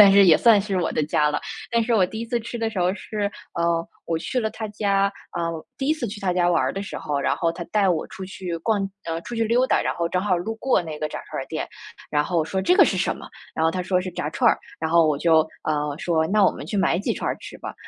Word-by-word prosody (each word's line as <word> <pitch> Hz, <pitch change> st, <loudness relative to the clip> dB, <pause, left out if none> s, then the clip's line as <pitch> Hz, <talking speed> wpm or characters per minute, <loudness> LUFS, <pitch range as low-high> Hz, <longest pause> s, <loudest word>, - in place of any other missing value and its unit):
但 200 Hz, -1 st, +10 dB
是 200 Hz, 0 st, +7 dB
也 165 Hz, -4 st, +7 dB
算 225 Hz, -4 st, +6 dB
是 195 Hz, -1 st, -2 dB
我 170 Hz, -, 0 dB
的 155 Hz, -, 0 dB
家 150 Hz, 0 st, +2 dB
了。 150 Hz, -, -1 dB, 0.3 s
但 235 Hz, 0 st, +2 dB
是 230 Hz, +1 st, +1 dB
我 200 Hz, -4 st, +5 dB
第 220 Hz, +5 st, -5 dB
1 230 Hz, -, -4 dB
次 240 Hz, 0 st, -1 dB
吃 235 Hz, +1 st, -6 dB
的 225 Hz, 0 st, 0 dB
时 205 Hz, -5 st, -3 dB
候 180 Hz, +1 st, +2 dB
是， 205 Hz, 0 st, -3 dB, 0.2 s
呃， 170 Hz, 0 st, 0 dB, 0.2 s
我 165 Hz, -1 st, 0 dB
去 250 Hz, +9 st, -2 dB
了 220 Hz, -, -1 dB
他 220 Hz, -, -5 dB
家， 200 Hz, -1 st, +1 dB, 0.3 s
呃， 165 Hz, -1 st, -3 dB
第 270 Hz, -, -2 dB
1 310 Hz, -, +3 dB
次 295 Hz, -, -5 dB
去 205 Hz, +1 st, -7 dB
他 185 Hz, -2 st, +1 dB
家 175 Hz, -1 st, +2 dB
玩 170 Hz, -, +3 dB
儿 130 Hz, +1 st, 0 dB
的 195 Hz, -, -4 dB
时 190 Hz, -, -6 dB
候， 145 Hz, -2 st, -2 dB
然 -, -, +1 dB
后 165 Hz, -2 st, +1 dB
他 175 Hz, -, -6 dB
带 205 Hz, -3 st, +3 dB
我 165 Hz, -3 st, +1 dB
出 190 Hz, -, -7 dB
去 185 Hz, -2 st, -5 dB
逛， 210 Hz, +4 st, +1 dB, 0.2 s
呃， 165 Hz, 0 st, -3 dB
出 240 Hz, -, -6 dB
去 225 Hz, -, +2 dB
溜 240 Hz, +3 st, +3 dB
达， -, -, +2 dB
然 -, -, -1 dB
后 170 Hz, 0 st, -1 dB
正 180 Hz, -, 0 dB
好 190 Hz, -2 st, +1 dB
路 220 Hz, +6 st, -3 dB
过 235 Hz, -6 st, +2 dB
那 155 Hz, -2 st, -6 dB
个 155 Hz, 0 st, -2 dB
炸 -, -, -6 dB
串 -, -, -3 dB
儿 -, -, -6 dB
店， -, -, -3 dB, 0.5 s
然 150 Hz, 0 st, +2 dB
后 175 Hz, 0 st, 0 dB
我 155 Hz, -, +2 dB
说 190 Hz, +4 st, -2 dB
这 360 Hz, -, +3 dB
个 385 Hz, -, +8 dB
是 -, -, 0 dB
什 -, -, 0 dB
么？ -, -, -10 dB, 0.3 s
然 160 Hz, -, 0 dB
后 160 Hz, -, +4 dB
他 185 Hz, -, -2 dB
说 180 Hz, 0 st, +1 dB
是 185 Hz, -, -4 dB
炸 160 Hz, -4 st, -3 dB
串 -, -, +4 dB
儿， -, -, 0 dB, 0.2 s
然 160 Hz, 0 st, -1 dB
后 165 Hz, -1 st, +5 dB
我 150 Hz, -, +2 dB
就， 160 Hz, +1 st, +4 dB, 0.2 s
呃， 150 Hz, -1 st, -1 dB
说： 160 Hz, -1 st, +1 dB
“那 205 Hz, +1 st, +3 dB
我 -, -, +5 dB
们 -, -, -8 dB
去 210 Hz, -, -3 dB
买 180 Hz, -3 st, +2 dB
几 200 Hz, -, -1 dB
串 -, -, -3 dB
儿 -, -, -3 dB
吃 -, -, -10 dB
吧。” -, -, -6 dB
185 Hz, 315 characters per minute, -24 LUFS, 165-210 Hz, 0.5 s, 但